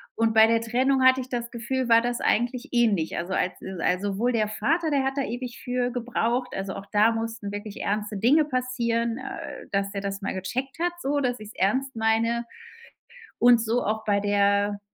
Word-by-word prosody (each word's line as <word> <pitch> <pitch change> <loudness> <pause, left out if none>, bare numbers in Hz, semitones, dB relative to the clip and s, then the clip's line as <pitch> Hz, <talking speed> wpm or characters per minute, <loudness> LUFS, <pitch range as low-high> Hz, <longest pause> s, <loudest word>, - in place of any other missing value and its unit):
Und 225 0 +1
bei 220 0 +8
der 225 0 +2
Trennung 260 +3 +1
hatte 260 0 +6
ich 255 - -9
das 235 -2 -3
Gefühl, 245 +2 -3
war 230 0 +6
das 240 0 -2
eigentlich 245 +4 0
ähnlich. 215 -9 +2
Also, 175 +2 -3
als 180 - 0 0.3
al 180 +2 +1
sowohl 205 +5 0
der 215 -2 +1
Vater, 315 +10 0
der 275 -2 +2
hat 270 - 0
da 275 - +1
ewig 245 +1 -6
für 245 -1 -1
gebraucht. 245 0 -1
Also, 195 0 -4
auch 195 0 -7
da 215 +2 +4
mussten 225 -2 -4
wirklich 205 0 -6
ernste 210 0 -2
Dinge 275 +10 +4
passieren, 235 -3 -1
äh, 265 +1 -7
dass 200 0 0
der 200 - -3
das 195 0 -4
mal 195 - -3
gecheckt 255 - -4
hat 350 +1 +1
so, 285 +1 0
dass 245 -2 -1
ich's 215 +1 -10
ernst 260 +7 0
meine. 225 +1 +1 0.9
Und 240 -1 +6
so 235 +2 0
auch 220 +1 -2
bei 205 -1 +2
der, 200 0 +2
230 Hz, 195 wpm, -25 LUFS, 205-250 Hz, 0.9 s, bei